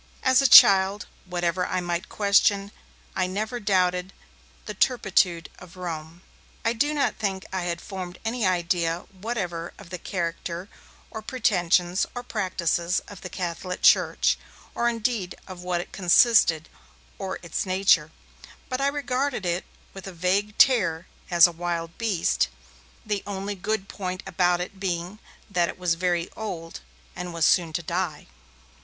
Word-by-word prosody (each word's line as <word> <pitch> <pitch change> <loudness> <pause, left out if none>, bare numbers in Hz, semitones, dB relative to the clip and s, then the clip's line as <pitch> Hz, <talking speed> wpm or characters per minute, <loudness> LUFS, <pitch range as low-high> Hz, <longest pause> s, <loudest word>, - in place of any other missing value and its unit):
As 260 +1 +5
a 275 - +5
child, 195 -1 +8 0.2
whatever 175 0 -1
I 185 - -1
might 175 0 -3
question, 200 0 +2 0.4
I 185 -1 +1
never 215 +6 -3
doubted 185 -2 +1 0.5
the 210 - -5
turpitude 190 -7 +1
of 180 0 -14
Rome. 165 -1 -6 0.4
I 230 - +2
do 290 +6 +1
not 285 - 0
think 190 -2 -2
I 185 -2 -2
had 170 -1 -2
formed 185 -3 -7
any 230 +1 -1
idea 175 -2 0
whatever 185 -5 -4
of 170 - -14
the 180 - -5
character 170 0 -4 0.4
or 220 - -6
pretensions 185 -7 +1
or 245 - -4
practices 180 -5 -1
of 205 - -11
the 185 - -7
Catholic 180 0 -5
Church, - - +4 0.3
or 235 0 +1
indeed 230 -5 -2
of 185 -2 -9
what 180 -1 -1
it - - -11
consisted, 180 - +4 0.5
or 190 -1 -4
its 170 - -2
nature; 185 -4 +3 0.6
but 255 +1 -2
I 275 - +3
regarded 280 -5 -1
it 175 +1 -1 0.3
with 195 0 -9
a - - -6
vague 195 +5 0
terror 185 -10 +4 0.2
as 175 -2 +7
a 175 - +2
wild 170 -1 -4
beast, 215 - +1 0.6
the 205 -2 -1
only 200 0 -3
good 200 +1 -3
point 185 -2 -5
about 175 -1 +1
it 190 +2 -7
being 180 +1 -3 0.3
that 175 -4 +1
it - - -7
was 180 -2 +1
very 175 0 0
old 170 -7 -6 0.4
and 180 0 -5
was 165 -1 +2
soon 170 -3 +3
to 175 - -2
die. 170 -2 -3
185 Hz, 150 wpm, -25 LUFS, 175-205 Hz, 0.6 s, child